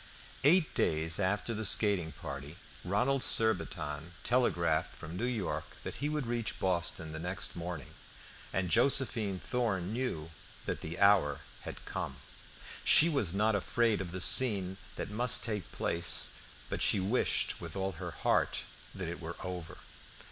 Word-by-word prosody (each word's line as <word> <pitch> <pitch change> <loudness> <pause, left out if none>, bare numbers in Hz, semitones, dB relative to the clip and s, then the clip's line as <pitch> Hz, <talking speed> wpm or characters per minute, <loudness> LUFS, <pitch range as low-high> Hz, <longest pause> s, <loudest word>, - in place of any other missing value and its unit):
Eight 160 +3 +4
days 80 +2 +1
after 105 +4 0
the 110 0 -4
skating 100 -5 +3
party, 70 +2 -8 0.3
Ronald 125 +9 +1
Surbiton 85 - -1
telegraphed 85 -10 +1
from 80 +2 -8
New 115 - -2
York 110 -8 -2 0.2
that - - -6
he 145 - 0
would 150 -3 -2
reach 120 -2 -2
Boston 85 -3 -1
the 80 - -6
next 90 +2 -3
morning, 85 -5 -6 0.6
and 90 -2 -1
Josephine 120 -5 +3
Thorn 105 -6 -2
knew 95 -11 -3 0.3
that - - -3
the 80 +2 -6
hour 100 -8 +4 0.2
had - - -7
come. - - -4 0.7
She 160 - +8
was 110 - +1
not 110 +2 +2
afraid 105 +2 +1
of 90 -3 -6
the 90 +1 -4
scene 95 -6 +4 0.2
that - - -5
must 120 +3 +3
take 105 -8 -3
place, 85 0 +1 0.4
but - - -4
she - - +5
wished 100 +7 +1
with 85 0 -7
all 95 0 -1
her 90 0 -6
heart 75 - 0 0.3
that 95 -3 -5
it 85 +1 -6
were 85 +1 -6
over. 90 -3 -6
95 Hz, 150 wpm, -32 LUFS, 85-115 Hz, 0.7 s, She